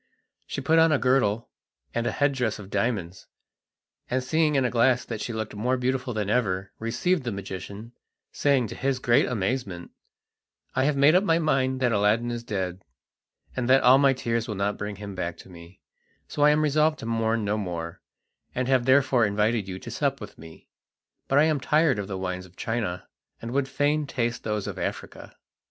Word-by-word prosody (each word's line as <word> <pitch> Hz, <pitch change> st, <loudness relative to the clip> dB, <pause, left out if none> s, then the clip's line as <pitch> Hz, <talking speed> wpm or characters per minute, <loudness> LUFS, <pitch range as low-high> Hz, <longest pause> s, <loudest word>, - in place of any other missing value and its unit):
She -, -, -4 dB
put 160 Hz, +4 st, +3 dB
on 165 Hz, 0 st, +5 dB
a 145 Hz, -, +4 dB
girdle 125 Hz, -4 st, +1 dB, 0.4 s
and 120 Hz, 0 st, -1 dB
head 145 Hz, -1 st, +1 dB
dress 125 Hz, -5 st, -1 dB
of 100 Hz, -1 st, -11 dB
diamonds, 100 Hz, -4 st, -2 dB, 0.8 s
and 130 Hz, +1 st, 0 dB
seeing 155 Hz, +2 st, +1 dB
in 135 Hz, -2 st, +2 dB
a 125 Hz, -, 0 dB
glass 125 Hz, +1 st, +3 dB
that 115 Hz, -3 st, -5 dB
she -, -, -3 dB
looked 110 Hz, -1 st, -4 dB
more 125 Hz, +5 st, 0 dB
beautiful 130 Hz, 0 st, -1 dB
than 105 Hz, -3 st, -2 dB
ever, 100 Hz, -4 st, 0 dB
received 150 Hz, +10 st, 0 dB
the 120 Hz, -, -3 dB
magician, 100 Hz, +3 st, -7 dB, 0.4 s
saying 140 Hz, -4 st, +2 dB
to -, -, -7 dB
his 135 Hz, 0 st, -1 dB
great 125 Hz, +2 st, +3 dB
amazement: 100 Hz, -5 st, -3 dB, 0.8 s
"I 130 Hz, +1 st, +2 dB
have 145 Hz, -1 st, +1 dB
made 140 Hz, +3 st, +6 dB
up 185 Hz, +2 st, +4 dB
my 165 Hz, -5 st, +3 dB
mind 130 Hz, -5 st, +1 dB
that 125 Hz, -2 st, +2 dB
Aladdin 110 Hz, +3 st, +2 dB
is 120 Hz, 0 st, -4 dB
dead, 95 Hz, -4 st, -4 dB, 0.7 s
and 130 Hz, -1 st, -2 dB
that 135 Hz, +1 st, +5 dB
all 130 Hz, +2 st, +7 dB
my 140 Hz, -1 st, +5 dB
tears 115 Hz, -2 st, -2 dB
will 105 Hz, -, -4 dB
not 100 Hz, +1 st, -1 dB
bring 105 Hz, 0 st, -5 dB
him 100 Hz, 0 st, -8 dB
back 85 Hz, -2 st, -4 dB
to -, -, -14 dB
me, 85 Hz, +1 st, -14 dB, 0.5 s
so -, -, -5 dB
I 145 Hz, -, +7 dB
am 150 Hz, +1 st, +3 dB
resolved 155 Hz, +1 st, +2 dB
to -, -, -6 dB
mourn 115 Hz, -1 st, 0 dB
no 105 Hz, +1 st, 0 dB
more, 85 Hz, -5 st, -5 dB, 0.5 s
and 130 Hz, 0 st, -1 dB
have 130 Hz, -2 st, +2 dB
therefore 130 Hz, -3 st, +4 dB
invited 105 Hz, 0 st, 0 dB
you 95 Hz, -1 st, -5 dB
to -, -, -9 dB
sup -, -, -1 dB
with -, -, -9 dB
me; 80 Hz, 0 st, -14 dB, 0.6 s
but 135 Hz, -, +2 dB
I 145 Hz, -, +6 dB
am 155 Hz, -2 st, +2 dB
tired 150 Hz, -3 st, +2 dB
of 100 Hz, -, -4 dB
the 95 Hz, -1 st, -4 dB
wines 90 Hz, 0 st, -4 dB
of 90 Hz, -, -24 dB
China, 110 Hz, -6 st, -3 dB, 0.3 s
and 115 Hz, -, -6 dB
would 135 Hz, +1 st, 0 dB
fain 145 Hz, +2 st, 0 dB
taste 120 Hz, -3 st, -2 dB
those 105 Hz, -2 st, -2 dB
of -, -, -5 dB
Africa." -, -, -6 dB
120 Hz, 200 wpm, -26 LUFS, 100-135 Hz, 0.8 s, all